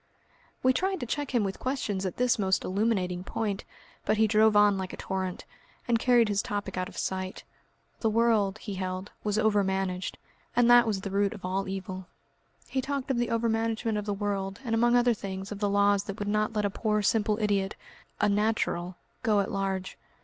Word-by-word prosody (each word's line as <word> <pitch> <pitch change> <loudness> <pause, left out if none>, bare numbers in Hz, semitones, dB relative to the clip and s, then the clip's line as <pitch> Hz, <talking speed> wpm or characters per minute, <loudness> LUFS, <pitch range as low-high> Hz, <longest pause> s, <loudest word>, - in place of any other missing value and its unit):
We 260 0 +5
tried 380 +7 0
to - - -2
check 290 +3 -2
him 240 -4 +2
with 195 -1 -3
questions 210 -8 -2
at 185 - -6
this 250 -2 +2
most 190 -1 +2
illuminating 185 -3 0
point, 200 0 -3 0.4
but 215 - +1
he 220 - +5
drove 215 0 +4
on 205 -1 +6
like 190 -1 -4
a - - -7
torrent, 190 -1 -3 0.4
and 235 -1 +3
carried 240 -1 +4
his 205 -1 +1
topic 205 -2 -4
out 185 0 -2
of - - -13
sight. 185 0 -3 0.6
The 225 - +1
world, 215 -3 +2
he 210 -1 -6
held, 185 +1 -4
was 210 0 0
overmanaged, 195 -4 0 0.4
and 245 -1 +5
that 240 -1 +7
was 205 -3 0
the 195 - -5
root 200 +2 +1
of 195 - -9
all 190 +1 -1
evil. 190 -1 -5 0.6
He 265 - -1
talked 275 0 -2
of 260 - 0
the 240 - 0
overmanagement 225 0 0
of 210 - -6
the 205 - 0
world, 195 -1 -2
and 230 - -1
among 240 +2 +4
other 245 0 +4
things 195 -1 -6
of 205 - -5
the 205 -1 +1
laws 200 0 +3
that 195 - -5
would 205 - -4
not 215 +1 +1
let 210 -1 0
a 200 - 0
poor 210 0 0
simple 210 0 +2
idiot, 200 -2 0 0.4
a 210 - +3
"natural," 200 -4 0 0.3
go 210 -2 +3
at 200 - -1
large. 195 -1 -2
205 Hz, 200 wpm, -28 LUFS, 195-225 Hz, 0.6 s, that